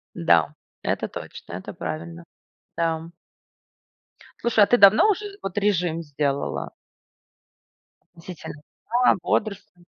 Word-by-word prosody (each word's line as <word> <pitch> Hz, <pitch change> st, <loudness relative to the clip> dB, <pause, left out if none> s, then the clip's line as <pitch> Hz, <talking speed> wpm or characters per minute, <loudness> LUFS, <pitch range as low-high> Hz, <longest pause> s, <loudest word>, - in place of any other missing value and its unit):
Да, 85 Hz, -1 st, +3 dB, 0.3 s
это -, -, -1 dB
точно, -, -, -9 dB
это -, -, -7 dB
правильно 85 Hz, +1 st, -6 dB, 0.5 s
там. 165 Hz, 0 st, -2 dB, 1.3 s
Слушай, 225 Hz, -3 st, +4 dB
а -, -, -2 dB
ты 245 Hz, -, +4 dB
давно 205 Hz, -, +7 dB
уже 405 Hz, 0 st, -3 dB
вот 195 Hz, +1 st, -5 dB
режим 175 Hz, -5 st, 0 dB
сделала? 140 Hz, -2 st, -2 dB, 1.4 s
Относительно 170 Hz, -2 st, -9 dB, 0.3 s
сна, 245 Hz, +2 st, +4 dB
бодрствования. 180 Hz, -4 st, -2 dB
175 Hz, 100 wpm, -24 LUFS, 145-210 Hz, 1.4 s, давно